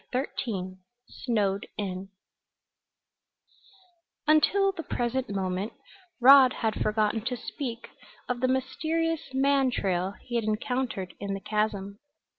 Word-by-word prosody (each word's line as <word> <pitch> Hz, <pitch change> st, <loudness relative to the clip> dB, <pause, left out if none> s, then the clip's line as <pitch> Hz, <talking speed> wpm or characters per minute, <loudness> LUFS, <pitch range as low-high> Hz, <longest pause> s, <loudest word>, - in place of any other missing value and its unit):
CHAPTER 260 Hz, +2 st, -1 dB
XIII 185 Hz, -5 st, -4 dB, 0.3 s
SNOWED 205 Hz, -5 st, -1 dB
IN 190 Hz, -2 st, -4 dB, 2.2 s
Until 380 Hz, +6 st, +4 dB
the 370 Hz, -, -6 dB
present 250 Hz, -4 st, -2 dB
moment 190 Hz, +1 st, -2 dB, 0.5 s
Rod 260 Hz, 0 st, +8 dB
had 220 Hz, -2 st, -1 dB
forgotten 215 Hz, +1 st, +1 dB
to 250 Hz, 0 st, -1 dB
speak 240 Hz, -3 st, -5 dB, 0.4 s
of 250 Hz, -1 st, -2 dB
the 255 Hz, -, +3 dB
mysterious 315 Hz, +4 st, -1 dB
man 270 Hz, 0 st, +3 dB
trail 190 Hz, -4 st, -1 dB
he 240 Hz, -, -2 dB
had 230 Hz, -, -1 dB
encountered 215 Hz, -3 st, -2 dB
in 200 Hz, -1 st, -3 dB
the -, -, -5 dB
chasm. 200 Hz, -1 st, -2 dB
235 Hz, 115 wpm, -28 LUFS, 200-265 Hz, 2.2 s, Rod